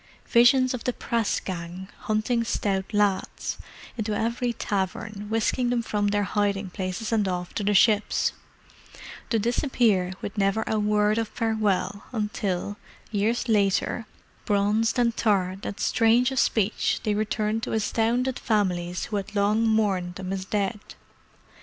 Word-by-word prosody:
Visions 255 Hz, +2 st, +5 dB
of 250 Hz, -, -5 dB
the 250 Hz, -, 0 dB
press 230 Hz, -3 st, -1 dB
gang, 180 Hz, 0 st, -6 dB
hunting 215 Hz, +2 st, 0 dB
stout 195 Hz, -4 st, -1 dB
lads, 205 Hz, -3 st, 0 dB, 0.4 s
into 215 Hz, -2 st, -2 dB
every 235 Hz, +2 st, 0 dB
tavern, 205 Hz, -1 st, -3 dB
whisking 225 Hz, +3 st, +1 dB
them 240 Hz, -1 st, 0 dB
from 205 Hz, -2 st, 0 dB
their 205 Hz, 0 st, +1 dB
hiding 200 Hz, -1 st, -1 dB
places 185 Hz, +4 st, -4 dB
and 215 Hz, -3 st, +2 dB
off 180 Hz, -1 st, -3 dB
to 210 Hz, -, -2 dB
the 205 Hz, +1 st, +2 dB
ships: 210 Hz, +1 st, +3 dB, 1.0 s
to 230 Hz, -, +2 dB
disappear 220 Hz, -5 st, +1 dB
with 205 Hz, +1 st, -5 dB
never 195 Hz, +3 st, +2 dB
a 220 Hz, -, 0 dB
word 210 Hz, +1 st, +2 dB
of 225 Hz, -, -1 dB
farewell 210 Hz, -3 st, -1 dB
until, 205 Hz, -3 st, -2 dB, 0.3 s
years 225 Hz, +4 st, 0 dB
later, 210 Hz, +1 st, +1 dB, 0.4 s
bronzed 210 Hz, +4 st, +2 dB
and 235 Hz, -2 st, +2 dB
tarred 195 Hz, -3 st, 0 dB
and 205 Hz, -, -6 dB
strange 240 Hz, +3 st, +3 dB
of 265 Hz, -, 0 dB
speech, 215 Hz, -1 st, +1 dB
they 210 Hz, -, +1 dB
returned 215 Hz, +1 st, -1 dB
to -, -, -4 dB
astounded 235 Hz, +4 st, 0 dB
families 180 Hz, -5 st, 0 dB
who 210 Hz, -, -3 dB
had 205 Hz, +1 st, -6 dB
long 210 Hz, +3 st, +2 dB
mourned 195 Hz, -5 st, +1 dB
them 190 Hz, 0 st, -4 dB
as 190 Hz, -1 st, -4 dB
dead. 205 Hz, +2 st, -1 dB
210 Hz, 145 wpm, -26 LUFS, 195-225 Hz, 1.0 s, Visions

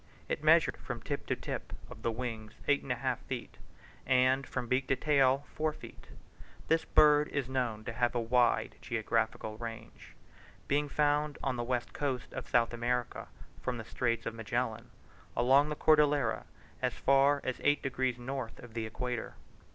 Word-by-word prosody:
It -, -, -3 dB
measured -, -, +5 dB
from -, -, -6 dB
tip -, -, -4 dB
to -, -, +1 dB
tip -, -, -6 dB
of -, -, -11 dB
the 115 Hz, -, 0 dB
wings, 115 Hz, -2 st, -5 dB
eight 145 Hz, 0 st, +3 dB
and 135 Hz, -, -5 dB
a -, -, +2 dB
half 125 Hz, 0 st, -1 dB
feet, 125 Hz, -3 st, -6 dB, 0.4 s
and 130 Hz, +1 st, +3 dB
from 125 Hz, -1 st, -3 dB
beak 130 Hz, +2 st, 0 dB
to 135 Hz, -, +3 dB
tail, 140 Hz, -1 st, +3 dB
four 155 Hz, 0 st, 0 dB
feet. -, -, -12 dB, 0.6 s
This 160 Hz, 0 st, +3 dB
bird 150 Hz, 0 st, +5 dB
is 140 Hz, -3 st, -2 dB
known 125 Hz, -5 st, -2 dB
to 120 Hz, -, -4 dB
have 120 Hz, +2 st, 0 dB
a -, -, +2 dB
wide 120 Hz, +1 st, +2 dB
geographical 110 Hz, -1 st, -1 dB
range, 115 Hz, -1 st, -8 dB, 0.5 s
being 145 Hz, +1 st, +1 dB
found 150 Hz, 0 st, +1 dB
on 135 Hz, -2 st, 0 dB
the 120 Hz, -, -2 dB
west 120 Hz, 0 st, -2 dB
coast 135 Hz, -4 st, -3 dB
of -, -, -6 dB
South 120 Hz, -1 st, +3 dB
America, 120 Hz, 0 st, -2 dB, 0.3 s
from 125 Hz, -1 st, -2 dB
the 115 Hz, -, -7 dB
Strait 115 Hz, -1 st, -1 dB
of 115 Hz, -, -3 dB
Magellan 115 Hz, +1 st, -3 dB, 0.5 s
along 135 Hz, +4 st, +5 dB
the 150 Hz, -, -2 dB
Cordillera 150 Hz, -6 st, +3 dB, 0.4 s
as -, -, 0 dB
far 140 Hz, +1 st, +4 dB
as 130 Hz, -, -3 dB
eight 145 Hz, 0 st, +3 dB
degrees 130 Hz, -2 st, -1 dB
north 125 Hz, -1 st, -5 dB
of 120 Hz, -2 st, -12 dB
the 115 Hz, -1 st, -3 dB
equator. 120 Hz, +1 st, -4 dB
125 Hz, 175 wpm, -32 LUFS, 115-140 Hz, 0.6 s, measured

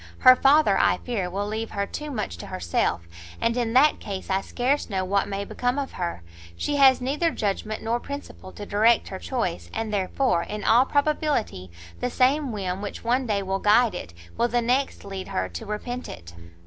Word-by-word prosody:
Her 255 Hz, -1 st, +8 dB
father, 295 Hz, +4 st, +4 dB
I -, -, +3 dB
fear, 210 Hz, -8 st, -3 dB
will 200 Hz, +3 st, -2 dB
leave 220 Hz, +2 st, -3 dB
her 200 Hz, -1 st, -2 dB
too 300 Hz, +8 st, -6 dB
much 215 Hz, -, -3 dB
to -, -, -8 dB
herself, 85 Hz, -1 st, -1 dB, 0.4 s
and 230 Hz, 0 st, +1 dB
in 235 Hz, -2 st, -1 dB
that 285 Hz, +4 st, +5 dB
case 195 Hz, -2 st, -6 dB
I 190 Hz, 0 st, +2 dB
scarce 255 Hz, +7 st, -1 dB
know 190 Hz, -2 st, -1 dB
what 200 Hz, +1 st, +1 dB
may 200 Hz, 0 st, -3 dB
become 245 Hz, +5 st, -1 dB
of 280 Hz, -1 st, -3 dB
her; 170 Hz, -, -4 dB, 0.3 s
she 290 Hz, -, -1 dB
has 265 Hz, -2 st, +6 dB
neither 290 Hz, +6 st, +1 dB
judgment 215 Hz, -4 st, -3 dB
nor 230 Hz, +2 st, 0 dB
principle 280 Hz, -8 st, -8 dB
to 205 Hz, -, -8 dB
direct 220 Hz, +4 st, +3 dB
her 190 Hz, -, -6 dB
choice, 140 Hz, -, -3 dB
and 220 Hz, -1 st, -3 dB
therefore, 195 Hz, 0 st, +1 dB
in 210 Hz, +3 st, -5 dB
all 240 Hz, +3 st, +5 dB
probability, 285 Hz, -, 0 dB, 0.3 s
the 250 Hz, -, -1 dB
same 265 Hz, +2 st, +2 dB
whim 190 Hz, -3 st, -3 dB
which 205 Hz, -, -6 dB
one 245 Hz, +2 st, +1 dB
day 200 Hz, -2 st, 0 dB
will 190 Hz, 0 st, -2 dB
guide 215 Hz, +3 st, +4 dB
it, 85 Hz, -, -7 dB, 0.2 s
will 235 Hz, -, +2 dB
the 240 Hz, +1 st, +1 dB
next 250 Hz, +2 st, 0 dB
lead 195 Hz, -1 st, -6 dB
her 95 Hz, 0 st, -2 dB
to 85 Hz, -, -7 dB
repent 245 Hz, +4 st, -5 dB
it." 85 Hz, +1 st, -10 dB
225 Hz, 200 wpm, -25 LUFS, 195-255 Hz, 0.4 s, Her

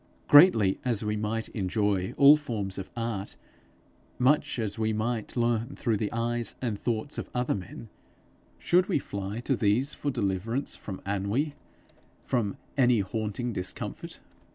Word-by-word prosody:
Greatly 145 Hz, -, +7 dB
as 120 Hz, -4 st, 0 dB
we 105 Hz, 0 st, 0 dB
might 110 Hz, +1 st, -2 dB
enjoy 100 Hz, -2 st, 0 dB
all 140 Hz, +1 st, +9 dB
forms 105 Hz, -10 st, -3 dB
of 95 Hz, -, -7 dB
art, 115 Hz, -4 st, -3 dB, 0.8 s
much 150 Hz, +3 st, +2 dB
as 110 Hz, -2 st, -3 dB
we 110 Hz, 0 st, +1 dB
might 110 Hz, +2 st, -2 dB
learn 120 Hz, -1 st, 0 dB
through 115 Hz, -, 0 dB
the 105 Hz, 0 st, -2 dB
eyes 120 Hz, 0 st, -2 dB
and 115 Hz, -5 st, -3 dB
thoughts 120 Hz, +4 st, -2 dB
of -, -, -6 dB
other 125 Hz, 0 st, +1 dB
men, 100 Hz, +4 st, -7 dB, 0.7 s
should 180 Hz, +2 st, +2 dB
we 195 Hz, -, +2 dB
fly 100 Hz, -4 st, -4 dB
to 135 Hz, +2 st, 0 dB
these 115 Hz, +6 st, +2 dB
for 145 Hz, -, -3 dB
deliverance 115 Hz, +2 st, -2 dB
from 95 Hz, -3 st, -7 dB
ennui, 100 Hz, +10 st, -1 dB, 0.7 s
from 110 Hz, -6 st, -1 dB, 0.2 s
any 125 Hz, -5 st, +4 dB
haunting 110 Hz, +4 st, -3 dB
discomfort? 90 Hz, -2 st, -5 dB
115 Hz, 145 wpm, -28 LUFS, 100-125 Hz, 0.8 s, all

